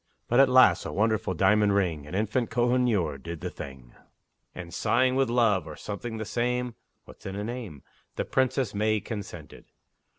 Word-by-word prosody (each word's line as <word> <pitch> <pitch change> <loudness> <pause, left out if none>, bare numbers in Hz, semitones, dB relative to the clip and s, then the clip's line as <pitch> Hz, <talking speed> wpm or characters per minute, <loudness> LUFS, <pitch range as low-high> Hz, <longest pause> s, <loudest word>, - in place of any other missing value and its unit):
But 120 - +3
at 135 -1 +6
last 125 -9 +6
a - - -5
wonderful 110 -3 0
diamond 100 +3 +3
ring, 85 -7 -1
An 85 - -6
infant 110 +4 0
Kohinoor, 120 - +1
did 85 +2 -7
the - - -4
thing, 65 -3 -10 0.6
And, 85 -2 -8
sighing 130 +2 +2
with 135 -2 +2
love, 115 -8 +2
or 75 - -8
something 110 +5 -6
the 110 - -4
same, 125 +2 -1 0.3
(What's - - -12
in 95 - -5
a 100 - -3
name?) 110 - -6 0.3
The - - -2
Princess 130 -2 0
May 110 +1 +1
consented. 105 0 -8
105 Hz, 170 wpm, -27 LUFS, 90-120 Hz, 0.6 s, at